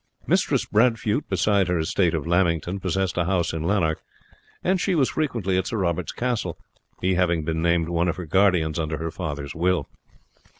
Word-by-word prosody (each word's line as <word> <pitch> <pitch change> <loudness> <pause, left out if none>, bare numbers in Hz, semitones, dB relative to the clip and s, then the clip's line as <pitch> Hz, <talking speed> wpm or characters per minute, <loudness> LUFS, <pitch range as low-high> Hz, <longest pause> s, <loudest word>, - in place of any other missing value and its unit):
Mistress - - +1
Bradfute, 115 +2 +1
besides 95 0 +2
her 90 - +1
estate 85 +1 +1
of 80 - -3
Lamington, 85 +1 +1
possessed 95 -1 -1
a 85 - +1
house 90 -2 0
in 80 - -3
Lanark; 85 -6 +1 0.6
and 185 0 +1
she 190 - +1
was 135 -5 +2
frequently 115 - 0
at 95 - -3
Sir 115 - -2
Robert's 85 -3 -1
castle, 120 -9 -2 0.4
he 95 +1 +2
having 85 -3 +1
been 80 0 -1
named 85 -1 +2
one 85 0 0
of 85 - 0
her 90 - -6
guardians 90 -2 +2
under 80 -1 -2
her 80 +1 -4
father's 75 -5 -5
will. 90 +2 0
90 Hz, 180 wpm, -24 LUFS, 80-100 Hz, 0.6 s, besides